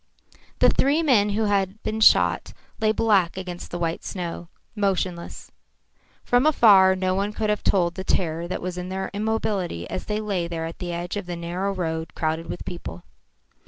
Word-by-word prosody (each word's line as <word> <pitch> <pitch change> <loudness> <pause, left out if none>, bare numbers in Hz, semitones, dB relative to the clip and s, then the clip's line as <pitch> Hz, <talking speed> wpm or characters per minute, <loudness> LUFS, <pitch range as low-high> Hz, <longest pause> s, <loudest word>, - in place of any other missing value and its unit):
The - - +5
three 290 +5 +2
men 225 -9 +4
who 210 +2 0
had 200 0 0
been 220 +1 -2
shot 220 - +4 0.3
lay 215 -1 +3
black 205 -6 +2
against 180 -2 -6
the 175 - -4
white 165 -1 -2
snow, 170 -2 -5 0.3
motionless. 185 -4 -2 0.7
From 245 +3 +3
afar 195 -10 +6
no 185 0 0
one 200 +2 -1
could 215 0 0
have 210 - -2
told 175 -3 +2
the 190 - -6
terror 170 -2 -1
that 180 - -4
was 180 0 -4
in 180 +1 -5
their 190 0 -4
immobility 205 - -2
as - - -4
they 210 0 -2
lay 195 -5 -2
there 165 -1 -4
at 165 - -7
the 175 -1 -4
edge 175 +3 -4
of 200 -3 -5
the 175 - -4
narrow 175 +4 -3
road 160 -4 -3
crowded 160 +1 -2
with - - -6
people. 90 - -7
190 Hz, 185 wpm, -24 LUFS, 170-210 Hz, 0.7 s, afar